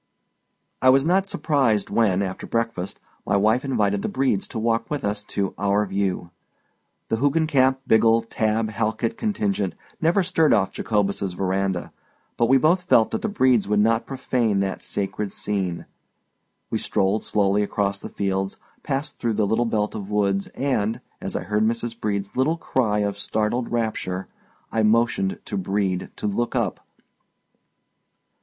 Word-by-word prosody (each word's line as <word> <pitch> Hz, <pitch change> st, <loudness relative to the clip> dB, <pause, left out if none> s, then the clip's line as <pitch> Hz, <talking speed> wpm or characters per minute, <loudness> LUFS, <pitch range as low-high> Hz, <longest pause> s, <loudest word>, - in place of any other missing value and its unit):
I 130 Hz, -, +6 dB
was 135 Hz, +2 st, +5 dB
not 190 Hz, +3 st, +2 dB
surprised 135 Hz, -, +1 dB
when, 100 Hz, -4 st, +2 dB
after 95 Hz, -1 st, -5 dB
breakfast, 115 Hz, -5 st, -2 dB, 0.2 s
my 100 Hz, -, +1 dB
wife 110 Hz, +5 st, +3 dB
invited 105 Hz, -7 st, +1 dB
the -, -, -2 dB
Bredes 130 Hz, -7 st, 0 dB
to -, -, -7 dB
walk 115 Hz, +1 st, 0 dB
with 145 Hz, -6 st, -2 dB
us 105 Hz, 0 st, -1 dB
to 100 Hz, -2 st, -2 dB
"our 100 Hz, +1 st, +2 dB
view." 95 Hz, -3 st, -2 dB, 0.8 s
The 110 Hz, -, +1 dB
Hoogencamp 140 Hz, -1 st, +3 dB
Biggle 115 Hz, +1 st, +4 dB
Tabb 110 Hz, 0 st, 0 dB
Halkit 110 Hz, +1 st, -1 dB
contingent 105 Hz, -, -1 dB, 0.3 s
never 170 Hz, +4 st, +3 dB
stirred 165 Hz, -4 st, +3 dB
off 95 Hz, -3 st, +1 dB
Jacobus's 100 Hz, -3 st, -1 dB
veranda; 95 Hz, 0 st, -1 dB, 0.4 s
but 120 Hz, -, +2 dB
we 135 Hz, +3 st, +6 dB
both 165 Hz, +7 st, +3 dB
felt 115 Hz, -10 st, +3 dB
that -, -, -2 dB
the 220 Hz, -, -1 dB
Bredes 130 Hz, -, +3 dB
would 105 Hz, 0 st, +2 dB
not 115 Hz, +2 st, +2 dB
profane 125 Hz, -6 st, 0 dB
that 95 Hz, -1 st, -2 dB
sacred 100 Hz, 0 st, -3 dB
scene. 95 Hz, -4 st, -3 dB, 0.9 s
We -, -, 0 dB
strolled 100 Hz, +3 st, +1 dB
slowly 100 Hz, -1 st, +1 dB
across 100 Hz, -1 st, -1 dB
the -, -, -7 dB
fields, 95 Hz, -1 st, -2 dB, 0.2 s
passed 140 Hz, 0 st, -3 dB
through 115 Hz, -1 st, 0 dB
the 105 Hz, 0 st, +1 dB
little 110 Hz, +4 st, +1 dB
belt 105 Hz, -2 st, 0 dB
of 100 Hz, -2 st, -6 dB
woods 100 Hz, -2 st, +1 dB
and, 115 Hz, -6 st, 0 dB, 0.2 s
as -, -, -4 dB
I -, -, -2 dB
heard 105 Hz, +3 st, 0 dB
Mrs. 115 Hz, +1 st, -1 dB
Brede's 100 Hz, -2 st, -2 dB
little 150 Hz, +6 st, +2 dB
cry 110 Hz, -9 st, 0 dB
of 100 Hz, -1 st, -2 dB
startled 110 Hz, +4 st, -1 dB
rapture, 110 Hz, -5 st, -2 dB, 0.4 s
I 110 Hz, -, +1 dB
motioned 110 Hz, -3 st, +2 dB
to -, -, -3 dB
Brede 95 Hz, -1 st, -1 dB
to -, -, -6 dB
look 115 Hz, +4 st, -1 dB
up. -, -, 0 dB
110 Hz, 155 wpm, -23 LUFS, 100-120 Hz, 0.9 s, I